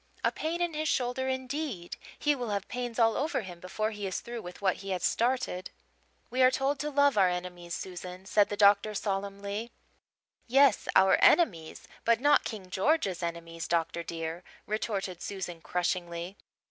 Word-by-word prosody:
A - - +3
pain 335 +2 -2
in 345 -2 -1
his 310 0 -1
shoulder, 255 +1 0
indeed! 260 - -3 0.2
He 295 - +2
will 245 -5 -4
have 200 -1 -2
pains 245 -2 -4
all 225 -2 +4
over 295 -1 0
him 180 -4 -9
before 215 +5 -2
he 205 -2 -4
is 185 - -2
through 235 -1 -6
with 180 -2 -9
what 190 -2 +1
he 195 - -8
has 185 -1 -2
started." 240 -6 0 0.6
"We 255 - +1
are 255 - +8
told 270 +2 0
to 300 - -2
love 285 -5 +3
our 185 -2 +5
enemies, 180 -1 -4
Susan," 180 0 -7
said 205 0 +3
the 205 - -3
doctor 205 +1 +5
solemnly. 200 +2 -3 0.8
"Yes, 270 -1 +4
our 190 0 +6
enemies, 170 - +3 0.2
but 230 0 +3
not 290 +2 +4
King 195 -5 -6
George's 195 - +1
enemies, 165 -1 -5
doctor 170 0 0
dear," 165 +1 -5 0.2
retorted 200 -4 -3
Susan 180 -4 -5
crushingly. 175 +1 -2
200 Hz, 170 wpm, -30 LUFS, 180-255 Hz, 0.8 s, are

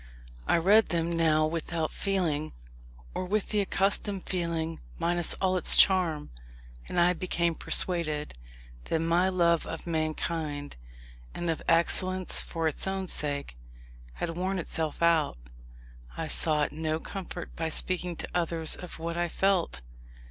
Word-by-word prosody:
I - - +3
read 205 +6 +4
them 170 0 0
now 155 -2 +3
without 165 0 -2
feeling, 170 -7 -1 0.6
or - - -3
with 200 +3 -1
the 210 - +1
accustomed 195 0 0
feeling 165 -3 -2 0.2
minus 175 0 +1
all 185 -1 0
its - - +4
charm; 175 -6 +3 0.6
and 175 - -1
I 175 +1 +4
became 170 -1 -1
persuaded, 155 -3 +3 0.5
that 165 - 0
my 170 +3 +2
love 170 -3 +2
of 165 - -6
mankind, 155 -2 -3 0.6
and 175 -1 -1
of 160 - -4
excellence 185 +2 +3
for 165 -1 -2
its 155 - -2
own 190 0 -2
sake, 140 - -2 0.5
had 165 - -4
worn 185 +2 -1
itself 160 -2 -3
out. 165 - +3 0.8
I - - -2
sought 150 -2 +3
no 155 +1 -2
comfort 180 -1 -7
by 160 0 -2
speaking 180 +1 -1
to - - -6
others 165 -2 +1
of 180 - -9
what 165 +1 -4
I 175 0 0
felt. 185 - 0
170 Hz, 140 wpm, -28 LUFS, 160-185 Hz, 0.8 s, read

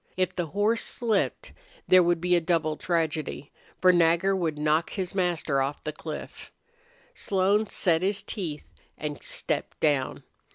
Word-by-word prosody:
If 185 0 0
the 175 -2 -2
horse 210 +6 +1
slipped 225 -5 -1 0.3
there 185 0 +7
would 175 -1 +2
be 180 +1 +2
a 175 - +3
double 160 -2 0
tragedy, 160 -4 -2 0.3
for 185 0 +6
Nagger 175 +3 +3
would 165 -5 -1
knock 155 +2 +1
his 185 -3 -4
master 175 -7 0
off 135 +2 -3
the 155 - -4
cliff. 155 0 -8 0.6
Slone 200 - +1
set 165 -2 +2
his 195 +2 0
teeth 165 -8 -5 0.3
and 150 -1 -5
stepped - - -2
down. 145 -4 0
175 Hz, 150 wpm, -27 LUFS, 155-190 Hz, 0.6 s, there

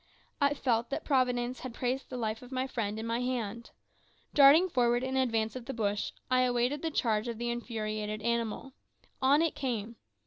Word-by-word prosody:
I 280 0 +3
felt 235 -4 0
that 275 - -3
Providence 250 -2 +1
had 255 -3 -7
placed 255 +2 -2
the 255 - -5
life 220 -2 -2
of 250 +1 -12
my 260 0 -1
friend 220 -5 -3
in 220 - -4
my 230 +1 -1
hands. 235 -3 -3 0.6
Darting 295 +6 +7
forward 245 -5 +2
in 260 0 -2
advance 225 -4 +1
of 250 -2 -6
the 270 - -4
bush, 205 -2 -1 0.2
I 255 0 +4
awaited 250 +3 +1
the 325 - -1
charge 225 -7 0
of 235 -2 -4
the 240 +1 -2
infuriated 215 -3 -4
animal. 235 +2 -2 0.5
On 280 +4 +5
it 330 - +1
came. 235 -4 -3
240 Hz, 185 wpm, -30 LUFS, 225-260 Hz, 0.6 s, Darting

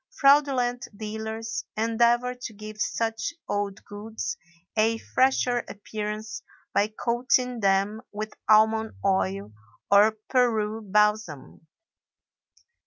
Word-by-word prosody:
Fraudulent 270 -4 +3
dealers 220 +1 -4
endeavor 235 +2 +2
to 245 -2 -8
give 215 0 -8
such 225 +8 -1
old 205 -1 -3
goods 220 - -5 0.4
a 225 +1 +3
fresher 255 0 +2
appearance 215 +1 -5 0.3
by 205 - +3
coating 245 +3 0
them 200 +2 +1
with 215 +1 -5 0.2
almond 220 +1 +4
oil 100 - 0 0.4
or 210 +2 +6
Peru 225 -4 +1
balsam. 210 -8 0
220 Hz, 95 wpm, -26 LUFS, 210-240 Hz, 0.4 s, or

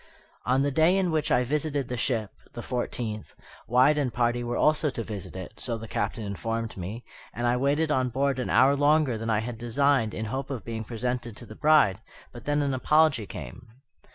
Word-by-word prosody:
On 130 +2 +3
the 145 - +1
day 160 +6 +4
in 185 -3 +1
which 155 -1 0
I 125 - +3
visited 145 0 -1
the 125 - -3
ship 115 -3 -1 0.2
(the 120 - -7
fourteenth), 120 -3 -4 0.3
Wyatt 130 +5 +4
and 135 -4 0
party 120 0 0
were 120 0 -2
also 155 0 +3
to 120 -4 -4
visit 105 -5 -7
it, 95 +3 -8
so 120 -3 -2
the 115 0 -8
Captain 110 +2 -2
informed 115 +3 -3
me, 100 +6 -6 0.3
and 120 - -2
I 120 0 +3
waited 145 +4 +1
on 130 -3 +1
board 135 +1 0
an 125 - -2
hour 130 +4 +5
longer 145 -2 +3
than 115 +1 -4
I 110 -1 +2
had 115 0 -6
designed 120 -1 +1
in 110 - -3
hope 135 +5 -4
of 130 -5 -5
being 115 -1 -4
presented 120 0 -4
to 120 - -8
the 110 - -10
bride; 145 -11 +4 0.3
but 120 -2 -11
then 145 0 +1
an 140 -1 0
apology 140 -4 +3
came. 90 - -9
125 Hz, 210 wpm, -27 LUFS, 115-140 Hz, 0.3 s, hour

